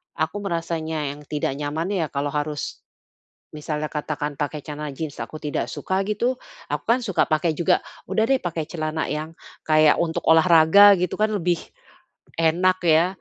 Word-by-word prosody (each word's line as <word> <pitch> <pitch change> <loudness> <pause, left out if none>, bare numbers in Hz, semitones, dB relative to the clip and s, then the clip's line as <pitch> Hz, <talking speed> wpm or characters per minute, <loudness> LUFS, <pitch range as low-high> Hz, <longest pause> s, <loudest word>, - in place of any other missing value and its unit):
aku 160 +6 -2
merasanya 160 -4 -2
yang 145 +1 -10
tidak 150 -2 -1
nyaman 150 +4 -3
ya 185 -5 0
kalau 140 +1 -2
harus, 150 0 -4 0.7
misalnya 150 0 -3
katakan 150 -1 -3
pakai 145 +1 -4
celana 150 0 -5
jin 155 -2 -4
aku 155 - -7
tidak 150 -1 -3
suka 190 +1 -1
gitu. 235 +5 0 0.4
Aku - - -1
kan 235 +2 +4
suka 195 -5 +1
pakai 160 +1 +2
juga, 165 +2 +2 0.3
udah 220 +3 +2
deh 270 0 +2
pakai 170 -3 -3
celana 155 -1 -3
yang 155 +2 -5 0.3
kayak 155 -1 +4
untuk 165 -1 -2
olahraga 170 +4 +7
gitu 180 -1 -1
kan 215 0 +3
lebih 175 -4 0 0.8
enak 175 +3 +3
ya, 160 +1 +5
160 Hz, 160 wpm, -23 LUFS, 150-180 Hz, 0.8 s, olahraga